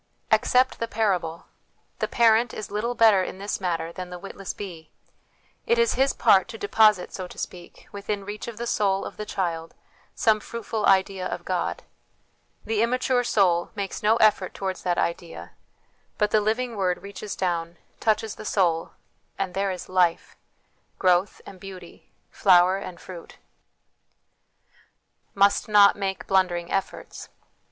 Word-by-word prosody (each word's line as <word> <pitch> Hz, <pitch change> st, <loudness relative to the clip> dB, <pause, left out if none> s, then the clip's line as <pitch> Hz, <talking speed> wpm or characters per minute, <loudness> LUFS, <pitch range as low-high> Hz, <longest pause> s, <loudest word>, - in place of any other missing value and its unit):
Accept 255 Hz, +1 st, +3 dB
the 230 Hz, -, -2 dB
parable: 185 Hz, -7 st, -1 dB, 0.5 s
the -, -, 0 dB
parent 230 Hz, 0 st, +3 dB
is 215 Hz, -, -7 dB
little 230 Hz, +4 st, -2 dB
better 220 Hz, -5 st, +5 dB
in 185 Hz, -, -5 dB
this 200 Hz, +1 st, -4 dB
matter 170 Hz, -2 st, -2 dB
than 180 Hz, +1 st, -7 dB
the 180 Hz, -, -7 dB
witless 195 Hz, +1 st, -7 dB
bee; 170 Hz, -6 st, -9 dB, 0.8 s
it 470 Hz, 0 st, +3 dB
is 470 Hz, -1 st, +3 dB
his 270 Hz, +1 st, +2 dB
part 190 Hz, -1 st, +4 dB
to 230 Hz, -1 st, -8 dB
deposit, 210 Hz, -2 st, +3 dB
so 185 Hz, -1 st, -5 dB
to -, -, -14 dB
speak, 175 Hz, -1 st, -8 dB
within 200 Hz, 0 st, -4 dB
reach 210 Hz, +2 st, -6 dB
of 235 Hz, -2 st, -7 dB
the 235 Hz, -, -4 dB
soul 195 Hz, -4 st, 0 dB
of -, -, -8 dB
the 210 Hz, -, -6 dB
child 165 Hz, -3 st, -3 dB, 0.4 s
some 220 Hz, -1 st, +3 dB
fruitful 220 Hz, -1 st, -3 dB
idea 190 Hz, -1 st, +2 dB
of -, -, -6 dB
God; -, -, -2 dB, 0.8 s
the 220 Hz, -1 st, 0 dB
immature 250 Hz, +1 st, +1 dB
soul 180 Hz, -7 st, +2 dB
makes 200 Hz, -2 st, -4 dB
no 215 Hz, +2 st, +4 dB
effort 215 Hz, -5 st, +2 dB
towards 190 Hz, -1 st, -4 dB
that 175 Hz, -1 st, -1 dB
idea, 170 Hz, 0 st, -3 dB, 0.7 s
but 210 Hz, -1 st, +1 dB
the 215 Hz, -, +4 dB
living 230 Hz, +3 st, -1 dB
Word 185 Hz, -3 st, -1 dB
reaches 200 Hz, +1 st, -7 dB
down, 170 Hz, -2 st, -2 dB, 0.2 s
touches 220 Hz, -1 st, 0 dB
the -, -, -10 dB
soul, 175 Hz, -6 st, 0 dB, 0.4 s
and 190 Hz, -2 st, -3 dB
there 195 Hz, +1 st, 0 dB
is 185 Hz, -1 st, -5 dB
life\ 180 Hz, -2 st, +1 dB, 0.6 s
growth 185 Hz, +1 st, +2 dB
and 190 Hz, -, -12 dB
beauty, 185 Hz, -2 st, -12 dB, 0.2 s
flower 185 Hz, -1 st, +4 dB
and 185 Hz, -3 st, -8 dB
fruit. 175 Hz, -3 st, -11 dB, 2.0 s
Must 200 Hz, 0 st, +3 dB
not 205 Hz, -1 st, +6 dB
make 195 Hz, -1 st, -3 dB
Blundering 180 Hz, -3 st, +1 dB
Efforts. 195 Hz, -1 st, -4 dB
195 Hz, 150 wpm, -25 LUFS, 180-215 Hz, 2.0 s, not